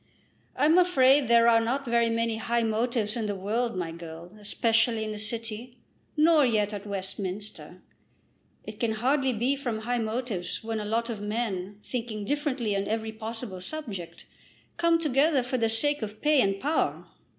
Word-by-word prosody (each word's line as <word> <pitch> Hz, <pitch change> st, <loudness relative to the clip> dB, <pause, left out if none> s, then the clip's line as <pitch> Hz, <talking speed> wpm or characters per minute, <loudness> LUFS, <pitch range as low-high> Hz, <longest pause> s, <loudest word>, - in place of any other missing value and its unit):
"I'm 305 Hz, +6 st, +5 dB
afraid 275 Hz, -6 st, +5 dB
there 235 Hz, 0 st, +5 dB
are 230 Hz, -1 st, +6 dB
not 260 Hz, +5 st, -1 dB
very 235 Hz, -1 st, +2 dB
many 230 Hz, 0 st, 0 dB
high 235 Hz, +1 st, 0 dB
motives 225 Hz, 0 st, 0 dB
in 225 Hz, -3 st, -2 dB
the 205 Hz, -, -2 dB
world, 220 Hz, +5 st, -1 dB
my 170 Hz, -3 st, -2 dB
girl, 170 Hz, +2 st, -9 dB
especially 225 Hz, +2 st, +2 dB
in 215 Hz, -, -4 dB
the 210 Hz, -, -5 dB
city; 230 Hz, +2 st, -2 dB, 0.4 s
nor 310 Hz, 0 st, +5 dB
yet 215 Hz, -4 st, +1 dB
at 205 Hz, 0 st, -6 dB
Westminster. 195 Hz, +1 st, -5 dB, 0.8 s
It 215 Hz, -1 st, -9 dB
can 230 Hz, -2 st, +1 dB
hardly 265 Hz, +4 st, +1 dB
be 245 Hz, +4 st, +1 dB
from 240 Hz, -6 st, -3 dB
high 240 Hz, +2 st, -1 dB
motives 220 Hz, -5 st, -3 dB
when 225 Hz, 0 st, -2 dB
a 210 Hz, -, -4 dB
lot 230 Hz, +3 st, -1 dB
of 215 Hz, -3 st, -6 dB
men, 205 Hz, -3 st, -3 dB
thinking 225 Hz, -4 st, -4 dB
differently 265 Hz, -5 st, -1 dB
on 195 Hz, 0 st, -1 dB
every 220 Hz, 0 st, -2 dB
possible 220 Hz, -3 st, -6 dB
subject, 190 Hz, -, -6 dB, 0.5 s
come 335 Hz, -1 st, +3 dB
together 295 Hz, -2 st, +2 dB
for 250 Hz, +1 st, -2 dB
the 225 Hz, -1 st, +2 dB
sake 290 Hz, +6 st, +1 dB
of 215 Hz, 0 st, -6 dB
pay 300 Hz, -2 st, +4 dB
and 195 Hz, -2 st, +1 dB
power. 295 Hz, +7 st, 0 dB
230 Hz, 170 wpm, -27 LUFS, 210-255 Hz, 0.8 s, are